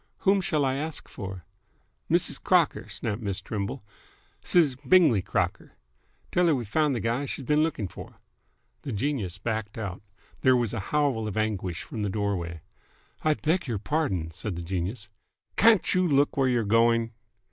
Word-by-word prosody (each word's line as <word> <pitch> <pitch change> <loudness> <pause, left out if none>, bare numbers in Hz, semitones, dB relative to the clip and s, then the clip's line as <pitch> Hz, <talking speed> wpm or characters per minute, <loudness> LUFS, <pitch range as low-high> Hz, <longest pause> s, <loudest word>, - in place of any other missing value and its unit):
"Whom 195 0 +4
shall 155 -6 +1
I 130 0 0
ask 155 +2 -5
for?" 95 -3 -7 0.6
"Mrs. - - +1
Crocker," - - +2
snapped 110 +1 -3
Miss 100 -3 -2
Trimble. 105 +4 -4 0.6
"Siz 155 -7 +3
Bingley 140 - +4
Crocker. - - -2 0.6
Tell 180 0 +3
her 160 - +4
we've 120 -5 -4
found 150 +4 +2
th' 115 - -3
guy 120 +5 0
she's 135 -1 -4
been 150 +2 +3
looking 155 -11 -1
for!" - - -11 0.6
The 135 - -5
genius 105 -6 -2
backed 110 +1 -3
out. 100 -4 -5 0.4
There 130 -1 +5
was 120 -3 -1
a - - -2
howl 140 -7 +1
of 105 - -4
anguish 95 -6 -2
from 110 - -6
the 105 - 0
doorway. 95 -5 -2 0.6
"I 155 -1 +2
beg 165 +3 0
your 115 -4 -1
pardon!" 100 - -1
said 100 +3 -5
the 85 - -5
genius. 95 +6 -3 0.5
"Can't 225 -5 +5
you 185 -1 +3
look 145 -2 +3
where 135 -1 +2
you're 120 -2 +2
going!" 115 +1 +3
115 Hz, 170 wpm, -27 LUFS, 100-150 Hz, 0.6 s, There